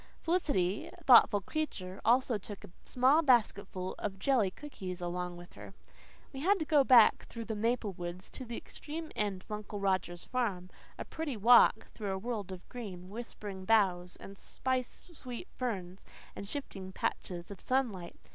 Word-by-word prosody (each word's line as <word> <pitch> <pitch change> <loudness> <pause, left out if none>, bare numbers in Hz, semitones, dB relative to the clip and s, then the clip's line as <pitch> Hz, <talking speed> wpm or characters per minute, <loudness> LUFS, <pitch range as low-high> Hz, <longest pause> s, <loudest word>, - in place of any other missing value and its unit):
Felicity, 285 - 0 0.2
thoughtful 235 -5 +7
creature, 190 -8 -4
also 240 -1 +3
took 205 +1 -9
a 200 - -11
small 265 +5 +4
basketful 200 - +2
of 195 -2 -3
jelly 225 -1 +2
cookies 185 -7 -7
along 175 0 -3
with 175 0 -12
her. 100 -1 -11 0.6
We 270 - -6
had 390 +8 +3
to 315 - -2
go 295 -2 +5
back 250 -4 +6
through 230 -1 -7
the 220 - -3
maple 225 -1 0
woods 175 +1 -6
to - - -7
the 235 -1 -6
extreme 315 +1 -7
end 200 -3 -2
of - - -16
Uncle 210 0 -5
Roger's 185 -3 0
farm 200 -8 -2 0.3
a - - -5
pretty 305 -7 -4
walk, 225 0 +6
through 205 -3 -3
a - - -2
world 210 -2 -4
of 185 -1 -9
green, 190 -7 -8
whispering 205 -4 -7
boughs 185 -4 +2
and 195 0 -11
spice 260 +6 -3
sweet 255 +2 -7
ferns, 195 -7 -4 0.3
and 200 - -6
shifting 195 -8 -5
patches 175 -1 -3
of 195 - -9
sunlight. 225 -10 -1
210 Hz, 165 wpm, -32 LUFS, 185-250 Hz, 0.6 s, thoughtful